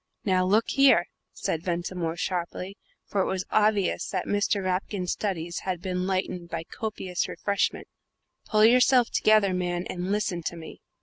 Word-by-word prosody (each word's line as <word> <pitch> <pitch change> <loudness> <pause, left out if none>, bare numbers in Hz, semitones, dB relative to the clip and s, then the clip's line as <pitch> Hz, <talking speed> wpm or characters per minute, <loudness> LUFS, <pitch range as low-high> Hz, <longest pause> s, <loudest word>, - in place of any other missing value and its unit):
"Now, 185 -2 +3
look 210 +5 +4
here," 275 -11 +5 0.3
said 160 - -3
Ventimore, 175 -1 -2
sharply 180 +2 -3 0.3
for 200 - -1
it - - 0
was 185 -1 -2
obvious 210 -3 +2
that 185 -2 -2
Mr. 205 -1 0
Rapkin's 185 0 -2
studies 170 -5 -3
had 185 -2 -3
been 180 0 -2
lightened 185 -2 -2
by 165 -1 -4
copious 190 -2 -4
refreshment 200 -1 -1 0.6
"pull 215 -1 +4
yourself 250 +1 +5
together, 215 -3 +4
man, 175 0 -2
and 180 +1 -4
listen 205 -4 -1
to - - -4
me." 160 -1 -10
185 Hz, 150 wpm, -26 LUFS, 175-205 Hz, 0.6 s, here